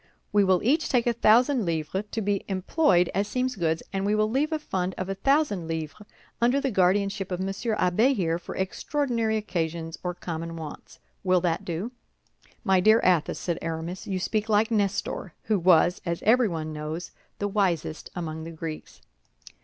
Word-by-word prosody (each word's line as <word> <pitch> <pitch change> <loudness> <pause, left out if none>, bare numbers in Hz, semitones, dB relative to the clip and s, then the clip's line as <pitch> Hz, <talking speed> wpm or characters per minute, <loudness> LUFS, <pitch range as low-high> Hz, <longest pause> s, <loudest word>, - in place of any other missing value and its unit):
We 205 -1 +5
will 185 -2 +3
each 300 +8 +2
take 245 -3 +2
a 240 - +2
thousand 235 +3 +4
livres 170 +3 -2
to 225 - -3
be 200 -1 0
employed 190 - +2
as 200 +2 0
seems 255 +2 -1
good, 165 -4 0
and 195 0 -1
we 205 +1 +2
will 215 0 +1
leave 290 +6 +1
a 315 - +1
fund 190 -11 -3
of 185 0 -4
a - - 0
thousand 205 - +1
livres 160 +5 -5 0.3
under 245 +4 +4
the 275 -2 -1
guardianship 195 0 +1
of 180 - -2
Monsieur 195 +4 -2
Abbé 215 +9 +3
here, 170 -5 0
for - - -8
extraordinary 230 +3 -1
occasions 165 -5 -3
or 180 -1 -3
common 165 -1 -5
wants. 160 -2 -9 0.3
Will 185 -1 +4
that 170 -2 -1
do?" 180 +8 -3 0.7
"My 190 -1 +4
dear 215 +4 +6
Athos," 175 -4 +2
said 170 -2 -2
Aramis, 165 +2 -4
"you 190 - -1
speak 215 +3 -1
like 215 +2 +3
Nestor, 200 -4 -1
who 210 -2 +1
was, 175 0 +4
as 170 -2 -3
everyone 195 -10 +2
knows, 155 +3 -5 0.3
the 205 - -1
wisest 185 -6 -1
among 160 -2 -4
the 165 - -6
Greeks." 160 -1 -7
190 Hz, 175 wpm, -26 LUFS, 170-220 Hz, 0.7 s, dear